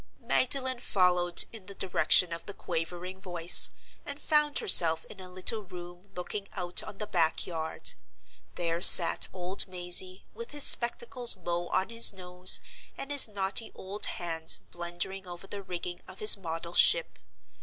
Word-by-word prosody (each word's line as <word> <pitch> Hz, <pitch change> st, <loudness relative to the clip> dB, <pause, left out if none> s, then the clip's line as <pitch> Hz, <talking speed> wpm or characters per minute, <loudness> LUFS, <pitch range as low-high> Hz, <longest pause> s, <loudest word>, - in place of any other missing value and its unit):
Magdalen 260 Hz, -1 st, -1 dB
followed 180 Hz, -5 st, 0 dB
in 210 Hz, -5 st, -13 dB
the 200 Hz, -, -11 dB
direction 180 Hz, -2 st, +2 dB
of 165 Hz, -, -9 dB
the 200 Hz, -, -8 dB
quavering 180 Hz, +3 st, -7 dB
voice, 175 Hz, -2 st, +3 dB, 0.3 s
and 285 Hz, 0 st, -8 dB
found 300 Hz, -1 st, +1 dB
herself 165 Hz, -, +4 dB
in -, -, -14 dB
a 185 Hz, -1 st, -10 dB
little 185 Hz, +4 st, +1 dB
room 175 Hz, 0 st, -13 dB
looking 195 Hz, +3 st, -6 dB
out 180 Hz, -2 st, -2 dB
on 195 Hz, -, -11 dB
the 210 Hz, -, -5 dB
back 165 Hz, -5 st, -1 dB
yard. 160 Hz, -2 st, -4 dB, 0.6 s
There 170 Hz, 0 st, -4 dB
sat 175 Hz, -1 st, +5 dB
old 185 Hz, +2 st, -3 dB
Mazey, 185 Hz, +1 st, -1 dB
with 235 Hz, +5 st, -10 dB
his 290 Hz, -1 st, -2 dB
spectacles 240 Hz, -, +3 dB
low 175 Hz, -1 st, -5 dB
on 190 Hz, +3 st, -3 dB
his 230 Hz, -2 st, +3 dB
nose, 180 Hz, -1 st, +3 dB, 0.4 s
and 275 Hz, -, -6 dB
his 285 Hz, -4 st, +4 dB
knotty 200 Hz, +1 st, -2 dB
old 195 Hz, +2 st, -4 dB
hands 165 Hz, -2 st, 0 dB
blundering 175 Hz, +2 st, -7 dB
over 175 Hz, +1 st, -10 dB
the 200 Hz, +1 st, -9 dB
rigging 180 Hz, -1 st, -8 dB
of 185 Hz, -, -13 dB
his 215 Hz, -, +8 dB
model 170 Hz, -2 st, -8 dB
ship. -, -, +2 dB
185 Hz, 155 wpm, -27 LUFS, 175-210 Hz, 0.6 s, his